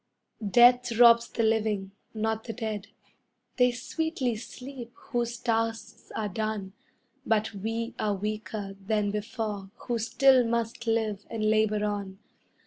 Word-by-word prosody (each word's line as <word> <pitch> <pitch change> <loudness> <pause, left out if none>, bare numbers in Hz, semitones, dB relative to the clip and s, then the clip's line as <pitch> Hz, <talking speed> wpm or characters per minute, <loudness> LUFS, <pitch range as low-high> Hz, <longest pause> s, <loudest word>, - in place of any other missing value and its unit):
] 210 -3 -6
Death 245 0 +6
robs 235 -1 +7
the 230 - -1
living, 215 -3 +1 0.2
not 220 0 -1
the 225 - -4
dead 220 -3 -4 0.7
they 250 -1 +5
sweetly 260 0 -2
sleep 250 +2 -9
whose 240 -1 -3
tasks 225 -1 -2
are 215 - -1
done; 210 -1 -3 0.5
But 220 -4 +1
we 225 +3 -3
are 210 -1 +1
weaker 210 0 -4
than 210 0 0
before 210 -2 -4
who 240 -2 -3
still 260 +3 +5
must 235 0 -2
live 220 -3 0
and 220 -2 -2
labor 215 -1 +2
on. 200 -2 -3
220 Hz, 135 wpm, -28 LUFS, 210-235 Hz, 0.7 s, robs